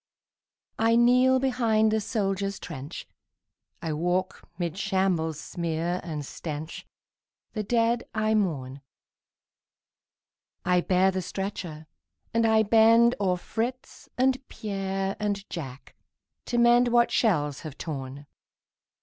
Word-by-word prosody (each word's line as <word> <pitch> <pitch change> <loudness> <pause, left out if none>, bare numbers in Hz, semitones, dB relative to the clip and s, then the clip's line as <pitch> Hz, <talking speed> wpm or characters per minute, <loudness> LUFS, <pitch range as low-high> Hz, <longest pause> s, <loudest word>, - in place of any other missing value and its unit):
I 225 +1 +4
kneel 250 +2 +5
behind 230 -5 +2
the 220 0 +1
soldier's 200 -2 -1
trench, 145 0 -8 0.8
I 160 -2 -2
walk 180 +4 -2
'mid 170 -2 -2
shambles' 185 -6 0
smear 170 +1 -2
and 150 -4 -5
stench, 155 +2 -7 0.7
The 215 - -2
dead 230 +2 +1
I 220 0 0
mourn; 140 -10 -1 1.8
I 180 0 +3
bear 185 +1 +3
the 190 0 -2
stretcher 180 -4 -5 0.5
and 230 0 +3
I 220 0 +4
bend 230 +2 +5
O'er 185 -3 +1
Fritz 235 +7 -5
and 260 +1 +2
Pierre 195 -2 -3
and 205 -1 -2
Jack 140 -6 -7 0.5
to 240 - -2
mend 240 +1 +5
What 240 0 +3
shells 150 - +1
have 155 -3 -9
torn. 140 -2 -6
195 Hz, 115 wpm, -27 LUFS, 165-225 Hz, 1.8 s, kneel